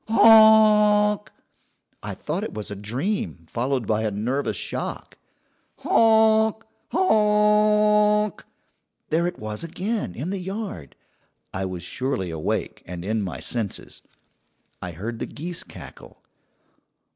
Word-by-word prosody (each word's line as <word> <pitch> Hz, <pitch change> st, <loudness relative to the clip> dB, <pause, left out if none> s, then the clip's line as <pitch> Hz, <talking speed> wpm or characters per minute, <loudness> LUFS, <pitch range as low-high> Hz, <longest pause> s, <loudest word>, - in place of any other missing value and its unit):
"'Honk!' 215 Hz, -2 st, +5 dB, 0.7 s
"I -, -, -6 dB
thought -, -, -4 dB
it -, -, -6 dB
was 105 Hz, -1 st, -6 dB
a -, -, -4 dB
dream 115 Hz, -, -4 dB
followed 125 Hz, +4 st, -2 dB
by 110 Hz, +1 st, 0 dB
a 110 Hz, -, 0 dB
nervous 120 Hz, +8 st, -2 dB
shock. -, -, -5 dB, 0.6 s
"'Honk! 220 Hz, 0 st, +3 dB, 0.3 s
honk!' 210 Hz, -, +3 dB, 0.7 s
"There 170 Hz, +2 st, +1 dB
it 175 Hz, -, -5 dB
was 110 Hz, +3 st, -6 dB
again, 185 Hz, -, -3 dB
in 155 Hz, +9 st, -4 dB
the 200 Hz, -, -3 dB
yard, 190 Hz, -, -6 dB, 0.6 s
I 95 Hz, 0 st, -2 dB
was 90 Hz, -2 st, -6 dB
surely 125 Hz, -9 st, -3 dB
awake 80 Hz, -1 st, -3 dB
and 90 Hz, 0 st, -7 dB
in 110 Hz, +1 st, -1 dB
my 95 Hz, -4 st, -5 dB
senses. 115 Hz, -5 st, -4 dB, 0.8 s
"I 90 Hz, -2 st, -6 dB
heard 115 Hz, +7 st, -6 dB
the -, -, -4 dB
geese 170 Hz, +3 st, -6 dB
cackle. -, -, -13 dB
175 Hz, 120 wpm, -23 LUFS, -, 0.8 s, Honk